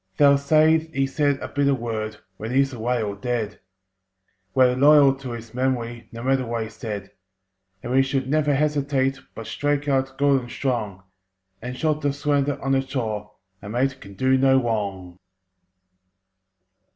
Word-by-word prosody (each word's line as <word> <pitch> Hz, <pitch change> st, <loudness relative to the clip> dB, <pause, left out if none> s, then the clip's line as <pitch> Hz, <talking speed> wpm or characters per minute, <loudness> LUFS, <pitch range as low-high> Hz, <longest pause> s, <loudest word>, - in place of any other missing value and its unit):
They'll 140 Hz, -1 st, +6 dB
say 155 Hz, +3 st, +4 dB
he 135 Hz, -2 st, +1 dB
said 140 Hz, 0 st, 0 dB
a -, -, -4 dB
bitter 140 Hz, 0 st, +1 dB
word 110 Hz, -3 st, -4 dB, 0.2 s
When 110 Hz, -, -5 dB
he's 135 Hz, +2 st, +2 dB
away 120 Hz, 0 st, -1 dB
or 100 Hz, -1 st, -3 dB
dead. 110 Hz, 0 st, -3 dB, 1.0 s
We're 125 Hz, -1 st, +5 dB
loyal 140 Hz, 0 st, +6 dB
to 130 Hz, -3 st, -7 dB
his 115 Hz, -1 st, -9 dB
memory, 120 Hz, -2 st, -2 dB
No 115 Hz, 0 st, -8 dB
matter 135 Hz, 0 st, +2 dB
what 115 Hz, -1 st, -2 dB
he 110 Hz, -, -7 dB
said. 105 Hz, -3 st, -6 dB, 0.7 s
And 120 Hz, -, -5 dB
we 135 Hz, +1 st, +5 dB
should 135 Hz, -1 st, -1 dB
never 150 Hz, 0 st, +2 dB
hesitate, 140 Hz, -2 st, 0 dB, 0.2 s
But 115 Hz, -, -7 dB
strike 145 Hz, +2 st, -1 dB
out 135 Hz, -1 st, 0 dB
good 140 Hz, -1 st, +3 dB
and 120 Hz, -, -10 dB
strong, 110 Hz, -8 st, -3 dB, 0.6 s
And 125 Hz, +2 st, -5 dB
jolt 155 Hz, +2 st, 0 dB
the 145 Hz, -1 st, 0 dB
slanderer 145 Hz, -1 st, 0 dB
on 135 Hz, -, 0 dB
the 135 Hz, -, +4 dB
jaw— 110 Hz, -6 st, -3 dB, 0.3 s
A 100 Hz, -, -8 dB
mate 130 Hz, +4 st, -1 dB
can 100 Hz, 0 st, -12 dB
do 130 Hz, +4 st, +2 dB
no 135 Hz, 0 st, +5 dB
wrong! 100 Hz, -6 st, -3 dB
130 Hz, 165 wpm, -23 LUFS, 115-140 Hz, 1.0 s, They'll